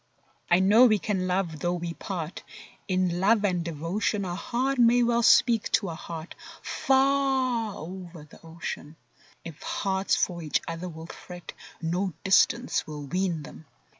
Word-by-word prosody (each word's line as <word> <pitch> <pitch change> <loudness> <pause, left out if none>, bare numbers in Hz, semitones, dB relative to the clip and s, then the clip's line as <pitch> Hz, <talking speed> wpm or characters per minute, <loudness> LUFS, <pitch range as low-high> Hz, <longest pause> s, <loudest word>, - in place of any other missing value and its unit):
I 175 +2 +5
know 215 +6 +7
we 215 -2 +3
can 190 -2 -2
love 180 -4 -1
though 175 +2 0
we 170 -1 -4
part; 170 -3 -5 0.5
In 185 -2 0
love 205 +2 +3
and 180 -3 0
devotion 170 +6 -2
A 175 - -3
heart 250 +8 -1
may 240 +1 +5
well 235 0 +2
speak 230 -1 +4
to 195 - +2
a - - -4
heart 160 0 -8 0.3
Far 265 -4 +1
over 175 -1 -9
the 155 - -17
ocean. 165 -2 -7 0.5
If 165 -3 -9
hearts 195 -1 0
for 175 -2 -1
each 155 -2 0
other 165 +2 -5
will 160 -1 -9
fret, 175 +1 -10 0.3
No 180 +3 -1
distance 230 +5 +3
will 150 -2 -7
wean 175 0 -1
them! 155 +1 -12
185 Hz, 155 wpm, -27 LUFS, 165-220 Hz, 0.5 s, know